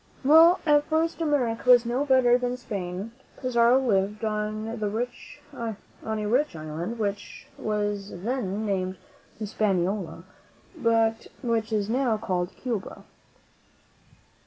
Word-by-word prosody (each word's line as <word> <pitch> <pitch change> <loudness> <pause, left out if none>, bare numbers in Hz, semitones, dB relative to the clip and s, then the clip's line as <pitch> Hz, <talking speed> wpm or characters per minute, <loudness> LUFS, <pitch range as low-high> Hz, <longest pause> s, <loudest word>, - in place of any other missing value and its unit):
Well, 325 +5 +7
at 295 -1 +4
first 325 +2 0
America 255 -6 0
was 245 -1 +7
no 250 +4 0
better 260 -3 +5
than 250 0 -1
Spain. 195 -2 -5 0.3
Pizarro 245 -1 +4
lived 210 -3 0
on 215 0 -2
a 220 -1 -5
rich 265 - +1
island, 160 +8 -5
which 205 -2 -4
was 205 -2 -2
then 210 0 -3
named 190 -2 -2 0.4
Hispaniola, 195 -4 -1 0.5
but 225 -5 +1 0.2
which 230 -2 0
is 210 -2 0
now 240 -1 +1
called 180 -5 -2
Cuba. 230 -7 -5
225 Hz, 110 wpm, -26 LUFS, 205-250 Hz, 0.5 s, Well